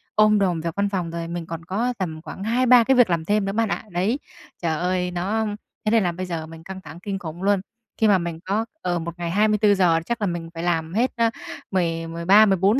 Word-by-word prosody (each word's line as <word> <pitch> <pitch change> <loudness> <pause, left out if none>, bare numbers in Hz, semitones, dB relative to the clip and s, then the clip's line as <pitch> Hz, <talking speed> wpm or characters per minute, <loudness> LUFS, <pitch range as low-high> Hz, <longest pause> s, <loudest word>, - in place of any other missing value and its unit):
ôm 215 -1 +5
đồm 180 -4 +1
việc 165 0 -4
văn 200 0 +1
phòng, 180 -4 -2
rồi 170 0 -4
mình 170 0 -4
còn 165 0 -7
có 225 +8 -1
tầm 160 -5 -4
khoảng 190 - -8
2-3 245 +2 +5
cái 265 +3 +3
việc 245 -5 +5
làm 165 -2 0
thêm 205 +2 +1
nữa 195 - -1
bạn 225 +1 0
ạ. - - -2
Đấy, 195 +10 0 0.4
trời 160 -3 0
ơi! 180 0 0
Nó 200 +5 -1 0.4
thế 215 - +2
nên 225 -3 +4
là 175 - +1
bây 185 +2 -5
giờ 165 -3 -4
mình 165 0 -11
căng 190 +2 -8
thẳng 160 0 -11
kinh 195 +1 -4
khủng 170 +1 -7
luôn. 200 -1 +3 0.4
Khi 220 - +3
mà 200 -2 +5
mình 170 -2 -4
có 210 +4 0 0.2
ờ, 175 -1 -1
một 170 +1 -5
ngày 170 -1 -2
24 210 +1 +3
giờ, 175 -4 +3
chắc 235 +2 -3
là 205 - +1
mình 170 -2 -4
phải 165 - -5
làm 165 -1 0
hết, 240 +5 +2
ơ, 230 -1 +3 0.4
mười 165 -3 0
mười 165 +1 -6
ba, 205 +4 +8
mười 195 -2 +3
bốn 200 +8 +3
185 Hz, 260 wpm, -23 LUFS, 170-210 Hz, 0.4 s, ba